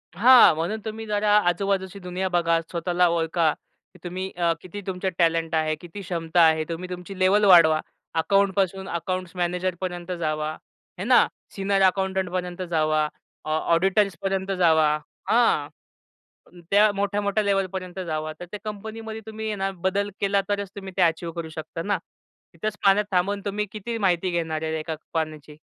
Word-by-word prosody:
हां, 245 -4 +8
म्हणून 170 +8 -2
तुम्ही 220 0 -5
जरा 210 0 0 0.2
आजूबाजूची 195 +1 -1
दुनिया 180 +1 -3
बघा, 170 -2 +2
स्वतःला 175 +2 0
ओळखा, 165 -1 +1 0.4
की 185 - -18
तुम्ही 185 +2 -4
अ, 170 -1 +2
किती 195 +3 -8
तुमच्या 190 0 -2
टॅलेंट 165 -1 +2
आहे, 155 0 +1
किती 175 +5 -10
क्षमता 170 -2 0
आहे 160 -1 +5
तुम्ही 175 +2 -5
तुमची 180 +2 -7
लेव्हल 200 +3 +4
वाढवा. 165 -5 +7 0.4
अकाउंट 195 +4 +3
पासून 190 -1 0
अकाउंट्स 185 +1 -3
मॅनेजर 180 +1 -1
पर्यंत 180 -1 -4
जावा. 155 -1 -1 0.5
हे 185 - -2
ना? 245 +2 +5 0.3
सीनियर 195 0 +1
अकाउंटंट 190 0 -1
पर्यंत 180 0 -3
जावा. 155 -2 +2 0.4
ऑ 155 - -3 0.2
ऑडिटर्स 195 +2 +2
पर्यंत 195 0 -1
जावा. 165 -4 +4 0.4
हा, 225 -11 +3 1.0
त्या 210 +1 +6
मोठ्या-मोठ्या 200 +1 0
लेव्हल 195 -1 +1
पर्यंत 185 0 -5
जावा. 155 -1 -3
तर 175 - -7
त्या 210 - -6
कंपनीमध्ये 220 +1 -6
तुम्ही 220 0 -5
हे 210 - -2
ना, 195 0 -1
बदल 190 +2 -1
केला 200 0 +2
तरच 200 -1 -1
तुम्ही 195 -2 -8
ते - - +2
अचीव्ह 165 0 +1
करू 165 -1 -5
शकता 160 +1 -6
ना. 205 +1 0 0.6
इथेच 210 +5 -4
पाण्यात 200 +2 +5
थांबून 195 +2 +1
तुम्ही 205 +1 -1
किती 225 +2 -4
माहिती 185 -3 +1
घेणार 160 -2 -2
आहे 160 0 -2
एका 160 0 -4 0.2
पाण्याची? 155 -2 -4
185 Hz, 165 wpm, -24 LUFS, 165-200 Hz, 1.0 s, हां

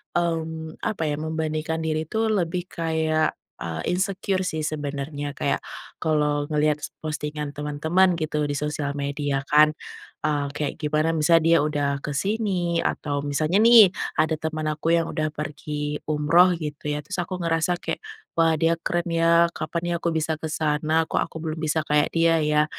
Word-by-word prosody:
mmm, 160 -2 -2
apa 195 -6 -2
ya, 145 - 0
membandingkan 160 0 -2
diri 155 0 -1
tuh 220 +6 0
lebih 180 -3 -1
kayak, 160 -1 0 0.3
eee, 80 -1 -4
insecure 190 +1 -1
sih 160 -3 -2
sebenernya. 145 -1 -4
Kayak - - -1 0.4
kalau 150 -2 +1
ngelihat 150 -1 +2
s - - -12
postingan 150 -1 -4
teman-teman 160 +6 +1
gitu 155 -2 -1
di 145 - -2
sosial 150 0 -2
media 140 -1 -2
kan, 150 +1 +6 0.5
ah, 145 -2 0
kayak 145 -1 -3
gimana, 155 +1 +1
misalnya 165 +1 +4
dia 165 0 +6
udah 145 -2 0 0.2
ke 145 - -3
sini 190 -3 0
atau 145 -1 -2
misalnya 155 +5 +1
nih 230 -4 +9 0.3
ada 160 0 +3
teman 155 -1 -3
aku 155 +2 0
yang 165 -1 0
udah 155 -1 -1
pergi 150 0 -4
umroh 155 +4 +4
gitu 150 0 -4
ya. 150 - -3
Terus 205 - -6
aku 180 +1 -5
ngerasa 165 +1 +1
kayak, - - -3 0.4
“Wah 165 -1 +4
dia 165 +2 +3
keren 175 0 -1
ya, 165 0 +5
kapan 165 +1 -3
nih - - +1
aku 170 - +1
bisa 160 0 0
ke 160 - -3
sana? 155 +1 +1
Kok - - 0
aku - - -9
belum 160 0 -3
bisa 155 0 +1
kayak 150 -1 +2
dia 165 0 +4
ya?” 150 0 +3
155 Hz, 170 wpm, -24 LUFS, 150-165 Hz, 0.5 s, nih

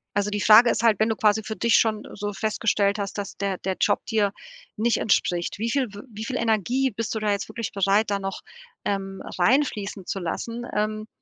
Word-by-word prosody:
Also 205 0 +1
die 205 0 -2
Frage 220 +4 +8
ist 235 - 0
halt, 220 -4 +4
wenn 220 - +3
du 220 - 0
quasi 215 0 +2
für 220 - -5
dich 235 -1 +2
schon 215 -2 +2
so 205 0 -4
festgestellt 210 -1 0
hast, 200 0 -4
dass 200 -1 -5
der 195 -2 -2
der 190 0 -3
Job - - +1
dir 210 -3 +1 0.4
nicht 230 +2 +1
entspricht, 175 -3 0
wie 230 +2 -1
viel 255 -4 0
w 205 - -8
wie 215 0 -7
viel 255 0 -2
Energie 235 +4 +1
bist 225 +1 -3
du - - -1
da 215 -1 0
jetzt 200 -1 -2
wirklich 230 -2 -4
bereit, 200 +2 +2
da 200 - 0
noch, 195 0 -5 0.4
ähm, 195 -1 -3 0.2
reinfließen 210 -3 +1
zu 195 - -3
lassen, 230 +7 -4
ähm, 215 +1 -1
210 Hz, 215 wpm, -24 LUFS, 200-225 Hz, 0.4 s, Frage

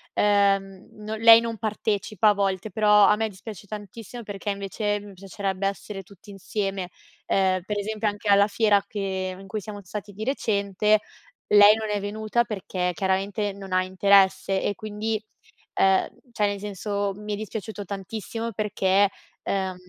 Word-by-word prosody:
ehm, 195 -2 +2
non 215 +1 -5
lei 230 0 +10
non 230 -1 -4
partecipa 215 -1 0
a - - +5
volte, 195 0 -1
però 210 0 +5
a - - +5
me 220 +1 -1
dispiace 205 +1 -10
tantissimo 220 +3 -8
perché 205 0 -6
invece 205 +1 -2
mi 205 -1 -12
piacerebbe 195 0 -4
essere 195 0 -4
tutti 200 +2 -18
insieme. 195 -1 -3 0.4
Ehm, 185 -1 +2
per 210 0 -3
esempio 215 +1 -1
anche 205 +1 -7
alla 200 0 +6
fiera 210 -1 +3
che 190 -2 -3
in 195 - -12
cui 215 +2 -4
siamo 205 +1 -8
stati 205 +2 -7
di 210 +2 -6
recente 210 -4 +1 0.5
lei 205 0 +9
non 220 -1 -4
è 205 -1 -1
venuta 215 +3 0
perché 185 -4 -3
chiaramente 195 +3 -1
non 195 -1 -10
ha 185 - +4
interesse 190 0 +3
e 205 - -1
quindi, 215 +1 -3 0.5
ehm, 190 -1 +3 0.2
cioè, 215 -3 0
nel 205 0 -1
senso, 200 0 -3
mi 210 +1 -5
è - - 0
dispiaciuto 215 0 -6
tantissimo 215 +4 -5
perché, 200 -2 +2 0.3
ehm, 190 -1 -1
205 Hz, 160 wpm, -25 LUFS, 195-215 Hz, 0.5 s, lei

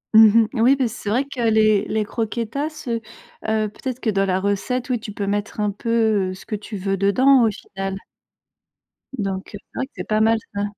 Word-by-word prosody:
Mmh 220 +1 +8
mh. 225 - -1
Oui, 255 +4 +6
et - - +3
puis, 260 -3 0
c'est 220 -2 -6
vrai 245 +6 +2
que 275 -3 -6
les 215 -2 +3
les 215 -1 -1
croquetas, 235 +8 -3
heu 230 -1 -1 0.5
heu, 220 -1 +1
peut-être 255 +4 -6
que, 220 - 0
dans 195 0 +1
la 185 0 +1
recette, 205 +6 -1
oui, 245 - +1
tu 215 -2 -7
peux 200 0 -3
mettre 205 +2 -2
un 210 -1 +1
peu, 220 -2 +1
heu, - - -4
ce 190 - -14
que 215 - -3
tu 210 +1 -7
veux 195 +1 -1
dedans, 250 +6 +5
au 220 - +3
final. 195 -1 -6 1.2
Donc, 195 -2 -3
heu, - - -5
c'est - - -58
vrai 265 - -1
que - - -46
c'est - - -6
pas 215 0 +2
mal, 225 +1 +4 0.2
ça. 200 - -1
220 Hz, 230 wpm, -22 LUFS, 200-235 Hz, 1.2 s, Mmh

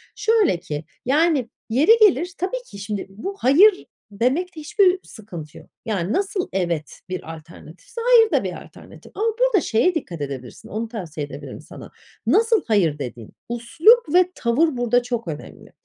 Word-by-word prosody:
Şöyle 435 - +2
ki 155 -4 -6 0.2
yani 285 -2 +2 0.2
yeri 275 - +4
gelir 360 -4 +4
tabii - - -3
ki - - -12
şimdi 200 0 -4
bu 220 - -6
hayır 370 - +5 0.3
demekte 290 - -1
hiçbir 375 +3 +2
sıkıntı 175 -9 -10
yok. - - -15 0.2
Yani, 200 -2 -2
nasıl 390 -1 -1
evet 170 -5 -2
bir 180 -3 -5
alternatifse 165 - -12
hayır 460 -2 +5
da - - +2
bir - - -5
alternatif - - -15
ama 425 - -1
burada - - +3
şeye 270 +10 +1
dikkat 175 - -5
edebilirsin, 135 -4 -7
onu 225 +2 -3
tavsiye 175 -10 -6
edebilirim 145 - -9
sana. - - -12 0.4
Nasıl 455 -1 +3
hayır 175 -10 +2
dediğin, 120 -5 -7 0.2
üslup 315 - +3
ve 360 0 +4
tavır 260 +5 +1
burada 245 0 +2
çok 240 -4 -4
önemli. 155 -3 -9
245 Hz, 155 wpm, -22 LUFS, -, 0.4 s, hayır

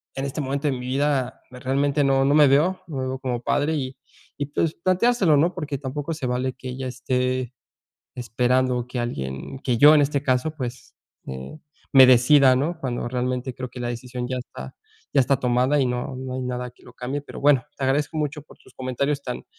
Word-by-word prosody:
e - - -5
en 135 - -2
este 140 +2 -3
momento 140 +2 -2
de - - 0
mi 125 0 -6
vida 135 -1 0
realmente 140 +3 0
no 135 -1 +3
no 140 - +3
me 150 -1 +7
veo 160 +8 +3
no 155 -5 -6
me 130 0 -2
veo 130 0 -4
como 125 -3 -3
padre 145 +5 0
y 130 -3 -3 0.4
y 145 - -2
pues 155 +2 -1
planteárselo, 185 -1 +3
¿no? 170 +6 +2
Porque 150 -5 -4
tampoco 145 +3 -4
se 150 -4 -5
vale 125 +1 -1
que 130 0 -8
ella 130 +1 -5
esté 125 0 -2 0.6
esperando 125 +1 0
que 125 - -5
alguien 70 - -5
que 125 -4 0
yo 150 +4 +8
en 150 - +5
este 140 -1 0
caso, 130 +3 0
pues, 130 -2 -6 0.3
eh, 65 - -7 0.4
me 135 -1 +10
decida, 130 +2 +6
¿no? 155 +7 -1
Cuando 120 -4 -3
realmente 125 +1 -2
creo 125 0 -6
que 125 - -9
la 120 - -2
decisión 125 +1 -5
ya 130 - -2
está 125 - -9 0.4
ya 140 - +6
está 135 +1 +1
tomada 125 +4 +2
y 130 - +2
no 125 +2 -3
no 130 0 -5
hay 130 - -3
nada 125 0 -4
que 125 - -26
lo - - -15
cambie. 135 +4 -4
Pero - - -10
bueno, 140 -3 +4
te 135 - -3
agradezco 145 +4 0
mucho 150 0 -3
por 155 - -18
tus - - -21
comentarios 140 +3 -2
tan 125 -3 -5
130 Hz, 215 wpm, -23 LUFS, 125-145 Hz, 0.6 s, me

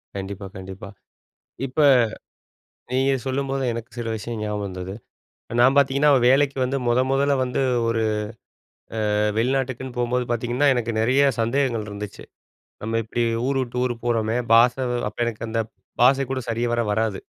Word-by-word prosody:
கண்டிப்பா, 100 0 -5
கண்டிப்பா. 95 0 -9 0.8
இப்ப, 130 +5 -5 1.1
நீங்க 135 +2 +2
சொல்லும்போது 135 0 -1
எனக்கு 115 0 -6
சில 115 - -3
விஷயம் 110 +1 -5
ஞாபகம் 105 -1 -2
வந்தது. 95 0 -6 0.7
நான் 130 +3 +5
பாத்தீங்கன்னா, 140 +2 +4 0.2
வேலைக்கு 140 +1 +4
வந்து 135 +2 -1
மொத 120 +1 +3
மொதல்ல 140 +1 +2
வந்து, 125 +1 -2 0.3
ஒரு 115 -1 +1 1.1
அ - - +1 0.2
வெளிநாட்டுக்குன்னு 130 0 -1
போம்போது 125 0 0
பாரத்தீங்கன்னா, 120 +4 +1
எனக்கு 120 -1 -1
நறைய 130 +5 +3 0.2
சந்தேகங்கள் 115 -2 0
இருந்துச்சு. 100 -1 -7 0.6
நம்ம 115 +1 -1
எப்டி 115 +2 -2 0.2
ஊர் 135 0 0
விட்டு 125 -1 -5
ஊர் 125 - -1
போறோமே, 115 -1 0 0.2
பாஷ 120 +1 +6 0.3
அப்ப 105 - -13
எனக்கு 115 -1 -4
அந்த 115 0 -1 0.4
பாஷை 135 +3 +5
கூட 130 -1 -1
சரிவர 120 +1 0
வராது. 110 -2 0
120 Hz, 140 wpm, -23 LUFS, 110-135 Hz, 1.1 s, பாஷ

